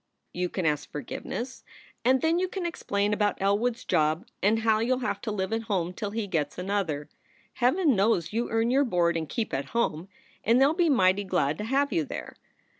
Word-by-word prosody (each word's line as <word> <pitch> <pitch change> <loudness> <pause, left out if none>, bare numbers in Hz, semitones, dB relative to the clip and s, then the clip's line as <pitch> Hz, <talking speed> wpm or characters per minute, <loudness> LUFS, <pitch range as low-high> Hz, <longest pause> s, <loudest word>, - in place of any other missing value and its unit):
"You 180 0 -1
can 185 -1 -3
ask 150 -1 0
forgiveness, 240 - -6 0.4
and 255 +1 +3
then 325 +2 +3
you 370 - +1
can 370 -1 -4
explain 205 -11 -1
about 210 -1 0
Elwood 205 +5 +1
s 245 - -13
job 155 +6 +1 0.2
and 220 +3 +3
how 220 -1 +3
you 245 +3 +2
ll 255 - -6
have 250 - -2
to 220 - -3
live 195 0 -2
at 225 0 -2
home 180 -3 0
till 205 +2 -4
he 220 +1 -3
gets 155 -6 -2
another. 180 -6 -2 0.5
Heaven 275 +3 +3
knows 195 -3 +1
you 235 +2 -1
earn 225 +1 +1
your 275 +2 +4
board 175 -8 +1
and 160 -2 -3
keep 225 -2 -3
at 135 +1 -1
home, 180 -5 0 0.3
and 235 +3 +4
they 270 - +6
ll 290 - +3
be 340 -1 +2
mighty 200 -7 +3
glad 155 -6 0
to 210 - -3
have 275 +4 +1
you 160 - +2
there. - - -7
210 Hz, 215 wpm, -27 LUFS, 180-245 Hz, 0.5 s, they